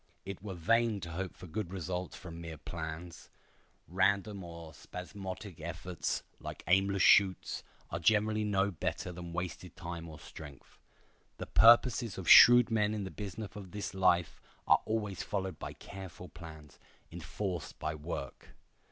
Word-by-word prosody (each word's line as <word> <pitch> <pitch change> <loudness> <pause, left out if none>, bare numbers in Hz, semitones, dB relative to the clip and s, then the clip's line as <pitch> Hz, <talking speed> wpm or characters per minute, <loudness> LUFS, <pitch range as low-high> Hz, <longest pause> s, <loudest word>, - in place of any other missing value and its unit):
It 100 -1 -6
were 100 -2 -6
vain 115 +4 +2
to 85 - -6
hope 95 +2 -4
for - - -11
good 95 +1 -4
results 90 0 -4
from 85 -3 -9
mere 85 -1 -7
plans. 85 +2 -7 0.6
Random 100 +3 +1
or 85 -2 -9
spasmodic 95 +2 -8
efforts, 85 +1 -3 0.2
like - - -8
aimless 95 +2 +3
shoots, 95 -3 +4 0.3
are 85 - -2
generally 110 +4 +3
no 100 -1 +1
better 90 +1 -3
than 85 -1 -8
wasted 90 0 -5
time 85 -1 -6
or 75 -1 -10
strength. 70 -5 -12 0.6
The - - -5
purposes 115 -1 +5
of 95 - -6
shrewd 120 0 +9
men 105 -1 +2
in 105 - -3
the 95 - -6
business 105 0 -7
of 100 -3 -8
this 105 -1 -4
life 90 -3 +2 0.2
are - - +5
always 105 -4 -2
followed 95 -5 -3
by - - -6
careful 95 -5 -10
plans, 80 -2 -12 0.3
enforced 85 +1 -5
by 80 - -3
work. 75 -4 -7
95 Hz, 150 wpm, -32 LUFS, 85-100 Hz, 0.6 s, shrewd